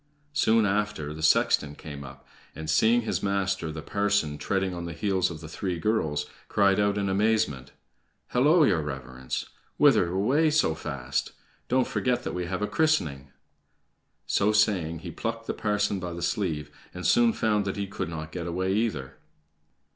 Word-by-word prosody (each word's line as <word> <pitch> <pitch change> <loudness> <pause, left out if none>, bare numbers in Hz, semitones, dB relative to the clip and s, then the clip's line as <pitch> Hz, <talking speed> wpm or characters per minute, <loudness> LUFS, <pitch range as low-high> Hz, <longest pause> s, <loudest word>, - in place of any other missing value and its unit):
Soon 115 -6 +3
after 100 -7 -1
the 80 - -8
sexton 75 -2 +3
came 70 -2 -8
up, 65 0 -12 0.3
and, 80 0 -3
seeing 115 +8 +4
his 110 - -1
master 100 -4 -1
the 80 0 -7
parson 100 -8 0
treading 95 +3 -1
on 85 -1 -5
the 85 - -5
heels 95 0 0
of 80 -3 -8
the 80 - -8
three 90 +3 -3
girls, 80 -6 0 0.2
cried 100 -1 +3
out 100 0 +2
in 100 -1 0
amazement: 95 -9 +1 0.6
"Hallo, 150 +7 +4
your 95 - +3
Reverence! 65 -3 -5 0.3
Whither 85 - +5
away 130 - +2
so 150 - +2
fast? 70 -4 -3 0.3
Don't 130 0 +2
forget 125 -1 0
that - - -4
we 90 -1 -3
have 95 +2 -2
a - - +1
christening!" 80 - +1 1.0
So 100 +1 +2
saying, 90 -7 +1
he - - -5
plucked 115 0 -4
the - - -2
parson 105 -2 0
by 90 -1 -5
the 85 - -5
sleeve, 80 -9 -1 0.2
and 90 - -6
soon 240 -1 +5
found 105 - +1
that 100 +1 -3
he 100 - -1
could 95 -4 -4
not 80 -1 -6
get 85 0 -5
away 95 +2 -1
either. 95 - -2
95 Hz, 170 wpm, -27 LUFS, 80-105 Hz, 1.0 s, Whither